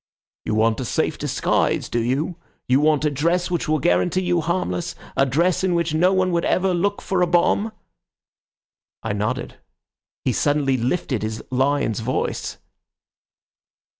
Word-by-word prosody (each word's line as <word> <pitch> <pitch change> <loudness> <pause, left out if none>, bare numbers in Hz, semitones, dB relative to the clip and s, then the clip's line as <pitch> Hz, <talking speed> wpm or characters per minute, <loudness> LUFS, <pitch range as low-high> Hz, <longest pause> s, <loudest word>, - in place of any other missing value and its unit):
'You 110 - -1
want 110 0 +2
a 130 - -3
safe - - -1
disguise, - - 0
do 120 - -1
you? 140 +9 -1 0.3
You 130 +2 +4
want 150 0 +2
a 150 - +2
dress 170 +6 0
which 170 -3 -1
will 155 - +3
guarantee 90 - +1
you 175 -1 +1
harmless; 175 +1 -2 0.2
a 135 - +3
dress 170 +8 +1
in 185 -2 +2
which 170 -2 0
no 175 +4 +3
one 185 -1 +2
would 170 0 +1
ever 185 0 +1
look 200 +4 -1
for 190 -2 0
a 180 - +3
bomb?' 175 +5 +2 1.3
I 110 - -2
nodded. 105 +5 -3 0.7
He - - +2
suddenly 145 -2 +1
lifted 130 0 -1
his 110 +1 -4
lion's 130 -3 +1
voice. 120 +3 -2
155 Hz, 155 wpm, -22 LUFS, 130-175 Hz, 1.3 s, You